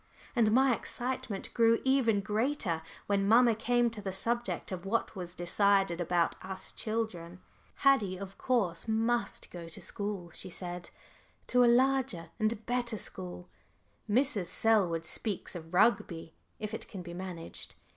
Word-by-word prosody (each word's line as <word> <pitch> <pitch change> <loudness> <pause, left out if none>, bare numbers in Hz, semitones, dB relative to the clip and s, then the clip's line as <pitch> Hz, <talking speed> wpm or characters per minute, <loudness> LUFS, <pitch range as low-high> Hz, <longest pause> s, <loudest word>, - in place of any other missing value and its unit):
And 225 -3 +4
my 260 +2 +5
excitement 250 -5 -4
grew 230 -1 +4
even 250 -6 +3
greater 210 - 0 0.2
when 200 -1 +1
mamma 235 +2 +6
came 240 +2 +2
to 220 -2 -8
the 195 -1 -3
subject 235 +4 -1
of 180 -2 -4
what 220 +3 -1
was 180 -2 -6
decided 195 0 +2
about 175 0 +1
us 190 0 -3
children. 190 -6 -3 0.4
"Haddie 220 -10 +3
of 195 0 -8
course 215 -8 +1
must 230 +2 0
go 170 -2 -7
to 160 - -5
school," 200 -4 -4
she 185 - -5
said; 175 -1 -4 0.6
"to 250 0 +4
a - - +6
larger 250 -9 +2
and 215 0 0
better 240 -2 -1
school 90 - -5 0.6
Mrs. 225 -5 +2
Selwood 185 -8 +2
speaks 195 +3 -2
of 165 -1 -8
Rugby, 180 -5 +2 0.2
if 215 0 -5
it - - -5
can 190 -4 -7
be 175 0 -8
managed. 180 -2 -7
205 Hz, 145 wpm, -31 LUFS, 175-235 Hz, 0.6 s, mamma